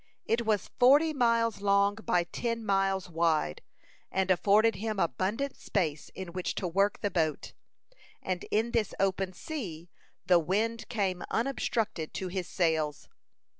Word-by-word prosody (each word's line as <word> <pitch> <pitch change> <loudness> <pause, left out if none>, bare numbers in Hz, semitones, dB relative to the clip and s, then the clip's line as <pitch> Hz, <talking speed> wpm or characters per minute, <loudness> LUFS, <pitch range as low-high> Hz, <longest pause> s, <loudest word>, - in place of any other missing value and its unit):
It 230 0 0
was 210 -2 0
forty 290 +6 +6
miles 230 -5 +2
long 200 0 +3
by 180 -5 0
ten 230 +5 -3
miles 195 -2 +1
wide, 160 - 0 0.5
and 190 0 +1
afforded 205 +3 +4
him 215 +1 -3
abundant 195 - -1
space 155 -7 -2
in 190 -2 -6
which 185 0 -3
to 185 - -2
work 195 +4 +1
the 205 - -1
boat. 155 -4 -1 0.7
And 185 -1 -3
in 225 +3 +1
this 225 -4 0
open 195 -1 0
sea 180 - -7 0.3
the 180 -2 +5
wind 220 +7 -1
came 190 -5 -1
unobstructed 225 - -1
to 185 - -3
his 180 -1 -3
sails. 160 -5 -1
195 Hz, 140 wpm, -29 LUFS, 180-225 Hz, 0.7 s, forty